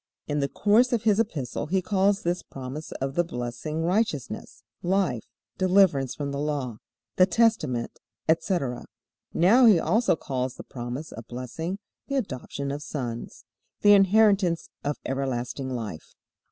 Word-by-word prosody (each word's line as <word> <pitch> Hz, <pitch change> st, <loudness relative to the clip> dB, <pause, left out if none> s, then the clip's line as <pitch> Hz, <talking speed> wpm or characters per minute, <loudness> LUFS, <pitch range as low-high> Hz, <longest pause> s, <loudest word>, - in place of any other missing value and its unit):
In 145 Hz, 0 st, -1 dB
the 140 Hz, -1 st, 0 dB
course 220 Hz, -, +3 dB
of 235 Hz, -2 st, +1 dB
his 215 Hz, -1 st, +3 dB
Epistle 155 Hz, -, -2 dB
he 190 Hz, +4 st, +2 dB
calls 195 Hz, +1 st, +1 dB
this 175 Hz, +1 st, 0 dB
promise 135 Hz, +4 st, -7 dB
of 135 Hz, 0 st, -3 dB
the 175 Hz, -, +2 dB
blessing 125 Hz, +3 st, -4 dB
righteousness, 180 Hz, -, -1 dB, 0.2 s
life, 180 Hz, -, +1 dB, 0.4 s
deliverance 185 Hz, -8 st, +3 dB
from 140 Hz, -1 st, -3 dB
the 140 Hz, -, -3 dB
Law, 140 Hz, -6 st, -2 dB, 0.4 s
the 185 Hz, -, +6 dB
testament, 180 Hz, -, +1 dB, 0.3 s
etc. 160 Hz, -, 0 dB, 0.5 s
Now 230 Hz, +9 st, +6 dB
he 210 Hz, -5 st, +7 dB
also 220 Hz, +4 st, +2 dB
calls 130 Hz, -4 st, -3 dB
the -, -, -9 dB
promise 125 Hz, +5 st, -6 dB
of 115 Hz, 0 st, -9 dB
blessing 130 Hz, +9 st, -5 dB, 0.3 s
"the 275 Hz, -, -2 dB
adoption 140 Hz, -, -3 dB
of 145 Hz, +1 st, -4 dB
sons," 120 Hz, -6 st, -5 dB, 0.4 s
the 205 Hz, 0 st, +7 dB
inheritance 195 Hz, -3 st, +4 dB
of 145 Hz, 0 st, -1 dB
everlasting 130 Hz, 0 st, -2 dB
life. 110 Hz, -10 st, -6 dB
155 Hz, 140 wpm, -26 LUFS, 130-195 Hz, 0.5 s, he